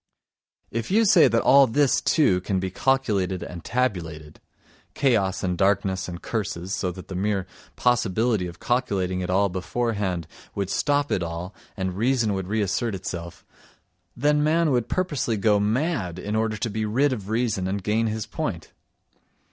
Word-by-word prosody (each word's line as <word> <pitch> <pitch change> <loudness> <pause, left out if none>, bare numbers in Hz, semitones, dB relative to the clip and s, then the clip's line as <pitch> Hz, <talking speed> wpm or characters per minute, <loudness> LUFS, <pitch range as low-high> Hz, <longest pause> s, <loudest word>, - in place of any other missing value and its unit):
If 115 0 -3
you 220 +4 +4
say 190 -5 +7
that 115 +1 +1
all 140 0 +7
this, 140 +3 +2
too, 100 - +3
can 95 0 -1
be 95 0 -3
calculated 100 -7 0
and 85 -2 -8
tabulated—chaos 95 - -2
and 90 -1 0
darkness 95 -1 +1
and 85 -1 -6
curses, 95 -4 -3
so 90 -3 -1
that 95 0 -10
the - - -7
mere 95 0 -1 0.3
possibility 115 -4 +1
of 85 -1 -10
calculating 95 -7 0
it 90 - -4
all 100 +2 +3
beforehand 95 -2 -2 0.3
would 100 -2 -2
stop 145 0 +1
it - - +1
all, 85 +3 -5 0.2
and 95 -2 -2
reason 115 0 +1
would 95 -2 -3
reassert 105 +2 0
itself, 85 -2 -7 0.7
then 150 +3 +2
man 160 +1 +2
would 120 -3 0
purposely 150 -11 -1
go 105 0 +3
mad 105 - 0
in 105 +3 -3
order 110 0 0
to 115 - -2
be 110 +1 -2
rid 130 +6 +2
of 105 -5 -6
reason 110 -5 0
and 100 0 -3
gain 110 +3 +1
his 110 -1 -3
point! - - -4
105 Hz, 160 wpm, -24 LUFS, 95-120 Hz, 0.7 s, say